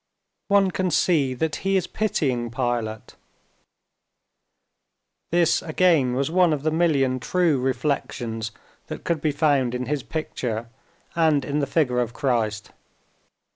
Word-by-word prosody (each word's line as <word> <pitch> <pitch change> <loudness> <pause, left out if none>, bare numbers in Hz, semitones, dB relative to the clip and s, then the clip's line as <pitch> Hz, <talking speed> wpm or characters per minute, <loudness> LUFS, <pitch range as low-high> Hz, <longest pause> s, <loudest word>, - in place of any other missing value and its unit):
"One 200 -2 +3
can 185 0 -1
see 145 -7 +2
that 155 +4 -1
He 195 0 +1
is 180 - 0
pitying 135 - -1
Pilate." 115 -3 -3 2.2
This 170 -1 +3
again 155 -6 +2
was 140 +3 -1
one 180 -2 +4
of 145 -2 -3
the 155 - +1
million 140 -6 +2
true 170 0 +1
reflections 125 -4 -2 0.4
that - - -7
could 165 -3 -1
be 155 - +1
found 140 -4 +1
in 125 0 -3
his 145 +2 -2
picture 120 -7 -4 0.5
and 155 -4 +2
in 145 +1 -1
the 140 - 0
figure 130 -5 +1
of 120 -1 -1
Christ. 115 -7 -1
140 Hz, 135 wpm, -24 LUFS, 125-165 Hz, 2.2 s, one